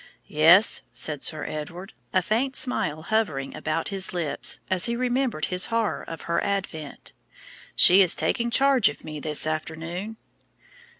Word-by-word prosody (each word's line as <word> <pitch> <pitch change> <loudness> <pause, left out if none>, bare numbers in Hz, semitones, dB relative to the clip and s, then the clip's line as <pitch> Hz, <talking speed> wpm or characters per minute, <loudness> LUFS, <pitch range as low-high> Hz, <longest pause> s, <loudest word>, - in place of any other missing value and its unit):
"Yes," 170 +7 +5
said 145 +3 0
Sir 155 -2 -1
Edward, 175 +6 -7 0.2
a 185 - +1
faint 235 +7 -1
smile 155 - -1
hovering 160 -11 -1
about 160 +1 -3
his 195 -2 -4
lips 170 -5 -2
as 185 -2 +1
he 235 - -1
remembered 250 - -1
his 180 0 +2
horror 230 -2 -1
of 165 - -9
her 170 0 -1
advent; 180 -7 -5 0.6
"she 185 +3 +8
is 180 -3 +5
taking 235 -2 0
charge 265 -2 +4
of 145 - -10
me 155 -1 -7
this 150 0 +1
afternoon." 165 +7 -5
180 Hz, 145 wpm, -24 LUFS, 155-220 Hz, 0.6 s, she